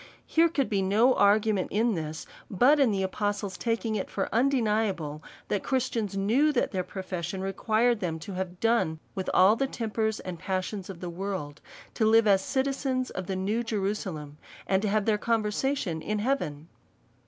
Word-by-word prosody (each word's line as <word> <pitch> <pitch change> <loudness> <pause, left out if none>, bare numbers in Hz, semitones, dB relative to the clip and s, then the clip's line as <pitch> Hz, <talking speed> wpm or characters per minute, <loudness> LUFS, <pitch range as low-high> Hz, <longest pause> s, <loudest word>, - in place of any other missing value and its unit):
Here 330 +1 +3
could 280 -5 0
be 200 -2 0
no 215 +7 +4
argument 205 -1 +3
in 225 +2 +1
this, 155 -3 -4 0.2
but 255 +10 +4
in 270 -4 +5
the 195 -2 0
apostle's 205 0 -2
taking 230 -1 -1
it 205 -3 -2
for 195 - -2
undeniable^ 215 - +1 0.3
that 205 - -1
Christians 235 -6 -1
knew, 240 +10 +3
that 250 - +1
their 185 -3 -1
profession 185 -1 -5
required 215 +4 +1
them 170 -4 -2
to 195 - -7
have 185 -1 -4
done 225 -9 +2 0.2
with 190 -2 -3
all 190 +4 +6
the 270 +3 0
tempers 220 -3 -2
and 180 -3 -7
passions 185 +1 -3
of 185 -3 -8
this 180 - -4
world, 175 -5 -5 0.3
to 220 - +1
live 225 0 +5
as 195 -2 +4
citizens 265 -1 -1
of 185 -1 -5
the 190 - -2
new 200 +5 0
Jerusalem, 190 -9 -3 0.3
and 190 0 +1
to 210 - 0
have 210 0 +1
their 215 -2 +2
conversation 215 - -1
in 210 +6 -2
heaven. 205 - -2
205 Hz, 175 wpm, -28 LUFS, 185-230 Hz, 0.3 s, all